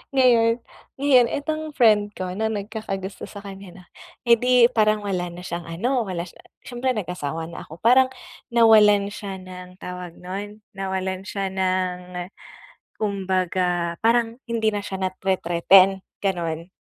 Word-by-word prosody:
Ngayon 235 -2 +4 0.3
ngayon 265 -3 +5
itong 310 +4 -3
friend 210 -4 +4
ko 185 -1 -4
na 215 +4 -1
nagkakagusto 205 -2 -5
sa 205 -1 -10
kanya 195 -1 -9
'no, 180 - -14 0.4
edi 245 0 +5
parang 215 -2 +2
wala 185 -3 -2
na 175 +1 -9
siyang 170 -1 -5
ano, 230 +8 -1
wala 175 -3 -3
siya 175 - -14 0.2
syempre 250 +1 -2
nag-asawa 170 -6 -4
na - - -8
ako, 160 - -10
parang 255 +3 +6 0.5
nawalan 210 -3 +6
siya 200 -2 -6
ng 180 0 -11
tawag 180 -1 -7
nun, 205 +4 -7
nawalan 190 -1 -4
siya 195 -1 -3
ng, 180 -1 -2 0.7
kumbaga 185 -4 -1
parang 230 +1 +1
hindi 220 -2 +1
na 205 - -2
siya 195 -1 -5
nate-threaten, 185 +1 +3 0.2
ganun. 170 -3 -2
195 Hz, 135 wpm, -23 LUFS, 180-225 Hz, 0.7 s, parang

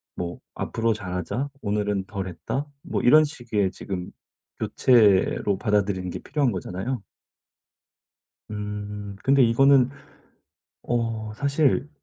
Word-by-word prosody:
뭐 85 0 -5 0.2
"앞으로 115 0 0
잘하자. 105 +7 -3
오늘은 105 -2 -1
덜 95 -2 -5
했다." 90 - -4 0.2
뭐 - - -2
이런 155 +5 +7
식의 120 -10 -1
지금 90 -2 -5 0.5
교체로 105 -4 +3
받아들이는 100 -4 0
게 - - -4
필요한 140 -4 0
거잖아요. 100 +5 -4 1.5
음. 105 -1 -5
근데 135 0 +4
이거는 130 +2 +5 0.9
어 115 -2 -2
사실 140 +1 +1
105 Hz, 225 characters per minute, -25 LUFS, 100-130 Hz, 1.5 s, 이런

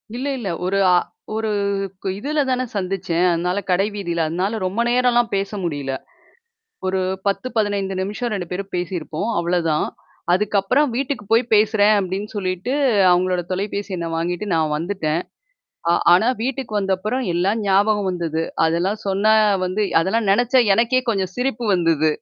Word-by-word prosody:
இல்ல 260 +3 -3
இல்ல. 225 -6 -4 0.2
ஒரு 195 +2 0 0.2
அ - - +6 0.4
ஒரு 220 0 -1 0.7
இதுல 295 +7 -1
தானே 255 0 0
சந்திச்சேன். 180 -3 -1
அதனால 180 +3 0
கடை 195 +3 +2
வீதியில. 170 -5 -1
அதனால 190 +7 -1
ரொம்ப 195 +5 -1
நேரம்லாம் 240 -1 +2
பேச 195 0 -1
முடியல. 145 -5 -3 0.9
ஒரு 190 0 0 0.3
10, 200 +5 -1
15 200 -2 0
நிமிஷம் 215 +5 -3
2 185 -4 -3
பேரும் 195 +2 -4
பேசியிருப்போம். 175 +1 -3
அவ்வளோதான். 170 -3 +1 0.5
அதுக்கப்புறம் 210 +8 +2
வீட்டுக்கு 270 -2 -2
போய் 230 +2 +5
பேசுறேன் 210 0 +4
அப்டின்னு 195 +2 -3
சொல்லிட்டு 185 +5 -2 0.4
அவங்களோட 180 0 +2
தொலைபேசி 200 +2 -3
எண்ண 170 -1 -3
வாங்கிட்டு 175 +4 -2
நான் 155 -2 +1
வந்துட்டேன். 165 -2 -2 0.7
அ - - +5 0.2
ஆனா 185 +6 +4 0.2
வீட்டுக்கு 260 -3 -3
வந்தப்புறம் 205 +6 -1
எல்லாம் 195 +6 +1
ஞாபகம் 200 0 +2
வந்தது. 165 -2 -2 0.2
அதெல்லாம் 175 +6 0
சொன்னா 200 +3 +3 0.3
வந்து 185 +4 -1 0.2
அதெல்லாம் 205 +4 0
நினச்சா 245 +5 +4
எனக்கே 240 +3 +2
கொஞ்சம் 190 -3 -2
சிரிப்பு 245 -2 -2
வந்தது. 165 -3 +2
195 Hz, 140 wpm, -21 LUFS, 175-220 Hz, 0.9 s, அ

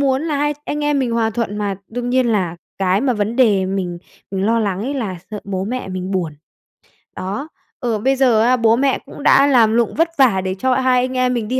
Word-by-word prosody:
muốn 270 0 +1
là 310 -3 -1
hai 295 +1 0
anh 295 0 -3
em 295 -1 +1
mình 250 -3 0
hòa 225 -1 +1
thuận 220 -2 -3
mà, 200 -2 -2
đương 245 +1 -4
nhiên 255 -1 +2
là 185 -6 0 0.2
cái 190 0 +2
mà 255 0 +1
vấn 215 +2 -2
đề 205 -7 +3
mình 185 -2 -3 0.3
mình 195 +1 -1
lo 230 +1 +2
lắng 200 -2 -1
ấy 275 +4 -3
là 215 -9 -3
sợ 210 -1 -5
bố 190 -1 -3
mẹ 250 +1 -4
mình 185 0 -4
buồn. 175 -5 -1 0.8
Đó. 205 +11 -4 0.3
Ừ, 235 -6 -1
bây 265 +5 +2
giờ 250 -5 +3
á, 245 +3 +4
bố 230 -1 +4
mẹ 270 +2 +1
cũng 285 - -10
đã 280 +1 +5
làm 230 -5 +4
lụng 235 -1 +1
vất 330 +1 +2
vả 240 -9 +4
để 185 0 -3
cho 260 0 +2
hai 255 -1 +3
anh 255 0 -4
em 255 0 +2
mình 225 -3 -2
đi 260 +2 -1
230 Hz, 245 wpm, -19 LUFS, 195-260 Hz, 0.8 s, đã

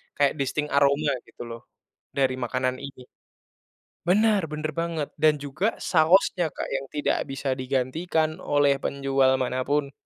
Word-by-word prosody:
kayak 145 +1 +1
distinct 150 +2 -1
aroma 140 +1 +3 0.2
gitu - - -10
loh, 115 0 -9 0.5
dari 130 -2 +1
makanan 130 +1 -1
ini. 140 -2 -9 1.0
Benar, 205 +2 +3
benar 155 0 -3
banget. 165 -3 -2
Dan 155 -1 +3
juga, 145 +10 -1
sausnya, 175 0 +3
Kak, - - -5
yang 135 0 -3
tidak 150 - 0
bisa 135 -1 -2
digantikan, 155 +6 -1
oleh 145 -1 +3
penjual 135 -1 +1
mana 130 0 -1
pun. 145 0 0
140 Hz, 135 wpm, -25 LUFS, 130-155 Hz, 1.0 s, aroma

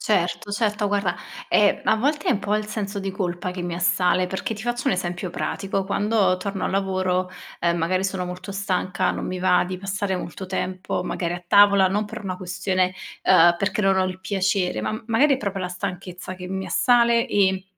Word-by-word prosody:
Certo, 180 -1 0
certo. 210 0 0
Guarda, 200 -3 0 0.3
ehm, 205 -1 +4
a 220 - +3
volte 295 +6 0
è - - +5
un 230 - +2
po' 210 +1 -1
il 215 0 -1
senso 205 -1 -4
di 195 0 -3
colpa 180 -2 -3
che 180 -1 -5
mi 175 -1 -3
assale, 180 +1 +2
perché 190 +4 -3
ti 215 - -8
faccio 240 0 -2
un - - +4
esempio 175 0 -3
pratico: 195 +1 -2
quando 200 -1 +2
torno 195 +1 -4
al - - -1
lavoro, 185 -1 0 0.3
ehm, 170 0 +2
magari 185 +3 0
sono 190 -1 -1
molto 180 +2 -7
stanca, 190 -2 0
non - - -4
mi 185 - -3
va 180 0 +3
di 185 0 -5
passare 195 0 -2
molto 180 +1 -6
tempo, 185 -1 -3
magari 175 -1 -2
a 175 - -7
tavola, 200 0 +6
non 205 +3 0
per 210 - -8
una 185 -2 -4
questione, 185 0 -1 0.3
ehm, 175 -2 +6
perché 200 +2 0
non 195 -1 +3
ho 190 - +3
il 185 0 -4
piacere, 190 -1 0
ma, - - -1
mhmm, 220 - -6
magari 275 +5 +4
è - - -2
proprio 195 -3 -3
la 180 - -2
stanchezza 180 0 -6
che 185 0 -8
mi 190 +1 -4
assale 235 -1 +3
e 190 -2 +2
190 Hz, 210 wpm, -23 LUFS, 180-205 Hz, 0.3 s, tavola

